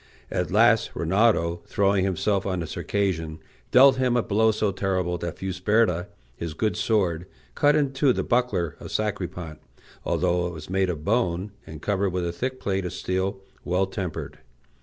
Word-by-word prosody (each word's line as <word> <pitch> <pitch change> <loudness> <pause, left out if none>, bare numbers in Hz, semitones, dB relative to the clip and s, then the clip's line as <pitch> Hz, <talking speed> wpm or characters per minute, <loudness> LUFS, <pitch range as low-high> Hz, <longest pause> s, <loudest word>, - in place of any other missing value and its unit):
At - - -1
last - - +3
Rinaldo, 85 -1 +2
throwing 100 -2 +2
himself 95 +1 0
on 95 -2 -2
the - - -3
Circassian, 80 -4 -2 0.3
dealt 130 +1 +7
him 125 -2 +2
a 120 - +2
blow 110 +2 +3
so 110 -1 +1
terrible 90 -2 -1
that 85 -2 -4
Fusberta, 95 0 +1 0.3
his 80 +1 -5
good 110 +5 0
sword, 90 -6 0 0.3
cut 145 0 +3
in 140 -3 +1
two 135 0 +3
the - - -1
buckler 100 - 0
of - - -9
Sacripant, 90 -6 -3 0.4
although 90 -1 +1
it 85 - -6
was 80 +1 -9
made 95 -1 +1
of 80 -3 -4
bone, 100 -3 0 0.2
and 80 -2 -10
covered 100 -1 +1
with 90 -1 -2
a 85 - -1
thick 130 +8 -4
plate 95 -1 -1
of 90 -1 -4
steel 95 +1 -2 0.2
well 90 +2 +1
tempered. 95 -3 -5
95 Hz, 170 wpm, -25 LUFS, 85-110 Hz, 0.4 s, dealt